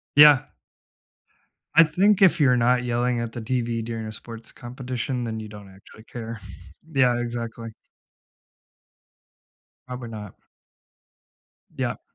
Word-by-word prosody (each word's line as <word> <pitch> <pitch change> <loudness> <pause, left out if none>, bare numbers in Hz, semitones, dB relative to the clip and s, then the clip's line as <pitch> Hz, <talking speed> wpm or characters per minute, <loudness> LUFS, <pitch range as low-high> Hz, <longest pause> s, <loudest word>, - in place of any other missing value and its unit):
Yeah. 145 -3 +8 1.3
I 165 - +9
think 190 +6 +3
if 185 -4 +6
you're 125 -4 +4
not 125 +1 +3
yelling 120 0 0
at 115 -1 -4
the 120 - -5
TV 120 -1 -1
during 115 -1 -5
a - - -6
sports 115 +1 -7
competition, 125 0 -4
then 110 -1 -4
you 110 - -7
don't 105 -2 -11
actually 100 +3 -16
care. 115 -1 -7 0.5
Yeah, 125 -3 +3
exactly. 115 -1 -5 2.2
Probably 125 -2 -6
not. 105 -3 -8 1.4
Yup. - - -2
120 Hz, 120 wpm, -24 LUFS, 115-125 Hz, 2.2 s, I